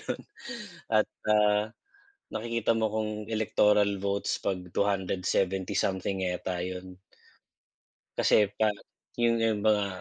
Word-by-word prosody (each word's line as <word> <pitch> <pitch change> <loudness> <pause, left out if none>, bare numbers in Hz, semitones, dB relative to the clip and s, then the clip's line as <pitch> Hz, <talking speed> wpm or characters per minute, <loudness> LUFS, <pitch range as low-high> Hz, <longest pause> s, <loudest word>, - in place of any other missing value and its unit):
ganun - - -4 0.7
at, - - +4 0.2
ah, 105 0 +4 0.6
nakikita 115 +1 0
mo 110 -1 +2
kung 110 -1 -1 0.2
Electoral 105 -2 +3
votes 100 0 -1
pag 95 -2 0 0.2
270 95 -1 0
something 95 0 0
yata 90 0 -2
'yun. 90 0 -6 1.2
Kasi 105 -2 +4
pa 110 -1 +4 0.5
'yung 115 0 +3
'yung 110 -2 +2
mga 105 -2 +3
100 Hz, 110 wpm, -29 LUFS, 95-110 Hz, 1.2 s, at